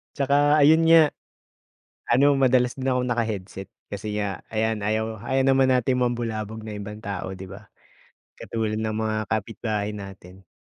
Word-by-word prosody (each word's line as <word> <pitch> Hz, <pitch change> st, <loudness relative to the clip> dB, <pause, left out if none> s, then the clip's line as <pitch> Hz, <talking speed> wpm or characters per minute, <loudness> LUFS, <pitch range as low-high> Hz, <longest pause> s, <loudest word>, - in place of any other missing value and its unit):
Tsaka 145 Hz, +1 st, +3 dB
ayun 155 Hz, +3 st, +6 dB
nga, 160 Hz, -3 st, +6 dB, 1.0 s
ano 140 Hz, +3 st, +5 dB
madalas 130 Hz, -2 st, +2 dB
din 135 Hz, 0 st, -3 dB
akong 125 Hz, -1 st, 0 dB
naka-headset. 105 Hz, -5 st, -3 dB, 0.2 s
Kasi 105 Hz, +1 st, -4 dB
nga 100 Hz, -4 st, -4 dB
ayan, 110 Hz, -1 st, -1 dB
ayaw 110 Hz, +1 st, -1 dB
ayaw 130 Hz, +1 st, +1 dB
naman 135 Hz, -1 st, +4 dB
natin 125 Hz, 0 st, +1 dB
mambulabog 115 Hz, -3 st, -2 dB
ng 110 Hz, -1 st, -7 dB
ibang 105 Hz, +1 st, -7 dB
tao 100 Hz, -2 st, -5 dB
di 95 Hz, 0 st, -9 dB
ba, 100 Hz, +2 st, -11 dB, 0.7 s
katulad 110 Hz, -1 st, -3 dB
ng 110 Hz, -1 st, -2 dB
mga 110 Hz, 0 st, -1 dB
kapitbahay 110 Hz, 0 st, -2 dB
natin. 95 Hz, -2 st, -11 dB
110 Hz, 145 wpm, -24 LUFS, 105-130 Hz, 1.0 s, ayun